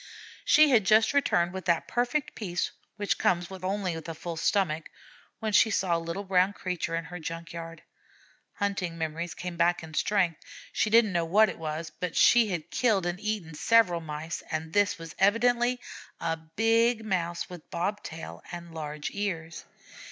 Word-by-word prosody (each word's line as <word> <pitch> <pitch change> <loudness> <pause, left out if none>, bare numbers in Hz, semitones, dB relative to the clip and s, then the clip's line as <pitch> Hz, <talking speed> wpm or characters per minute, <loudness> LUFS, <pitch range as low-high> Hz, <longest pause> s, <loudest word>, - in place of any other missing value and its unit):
She 305 -1 +6
had 230 -5 +5
just 220 +4 +4
returned 175 -11 +2
with 190 0 -6
that 170 -2 +1
perfect 245 +4 -1
peace 175 -5 -2 0.2
which 205 -1 -1
comes 175 0 +1
only 190 0 -2
of 165 0 -7
a 165 - -5
full 170 +1 -5
stomach, 165 -3 0 0.5
when 220 -2 -3
she 220 - +6
saw 185 -4 +1
a - - 0
little 170 +4 -4
brown 190 0 +2
creature 180 -4 -3
in 165 0 -3
her 180 - -7
junk 165 +1 -6
yard. 165 -1 -8 0.7
Hunting 195 -5 -2
memories 165 +1 -3
came 180 -1 -6
back 175 0 +2
in 160 -1 -10
strength; 180 -2 +1 0.3
she 215 - +1
didn't 220 -2 +5
know 170 -1 +1
what 210 +5 +5
it - - -7
was, 155 0 -4
but 180 -2 -3
she 235 -2 +6
had 175 -6 -4
killed 215 -7 +2
and 175 +1 -2
eaten 210 -6 -3
several 180 0 +3
Mice, 155 +1 -5
and 160 0 -4
this 205 -1 +3
was 165 -1 -9
evidently 240 +5 +3 0.4
a 165 - -1
big 225 +8 +1
Mouse 175 -4 -1
with 175 -3 -11
bob 200 +5 -2
tail 165 -5 -8
and 170 -1 -8
large 150 -2 -5
ears. 170 -6 -4
180 Hz, 175 wpm, -28 LUFS, 165-210 Hz, 0.7 s, She